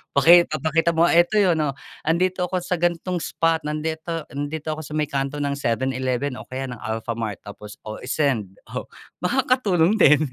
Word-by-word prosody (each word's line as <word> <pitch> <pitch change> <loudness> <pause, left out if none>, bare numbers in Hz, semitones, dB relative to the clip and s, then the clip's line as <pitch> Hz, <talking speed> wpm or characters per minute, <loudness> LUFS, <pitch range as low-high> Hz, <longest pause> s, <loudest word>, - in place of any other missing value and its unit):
Paki 170 +5 +8
papakita 160 +3 +1
mo, 170 +1 +3
"'Eto 175 +5 +4
'yun, 185 -4 +4
oh, 140 - 0 0.3
'andito 180 +3 +1
ako 185 - +1
sa 180 +1 -2
gan'tong 175 0 0
spot. 165 -1 0
Nandito 160 +2 -3
nandito 150 +2 -3
ako 155 - -7
sa 150 - -11
may 150 -1 +1
kanto 140 +1 -2
ng 140 -1 -1
7-Eleven 130 +1 -1
o - - -8
kaya 130 +1 -5
ng 125 -2 -7
Alfamart." 110 -2 -3
Tapos 105 +1 -10
o 110 - -4
i-send. 125 -8 -1 0.2
Oh, - - -5 0.3
makatulong 210 -5 +2
din. 150 -8 +6
155 Hz, 170 wpm, -23 LUFS, 130-170 Hz, 0.3 s, Paki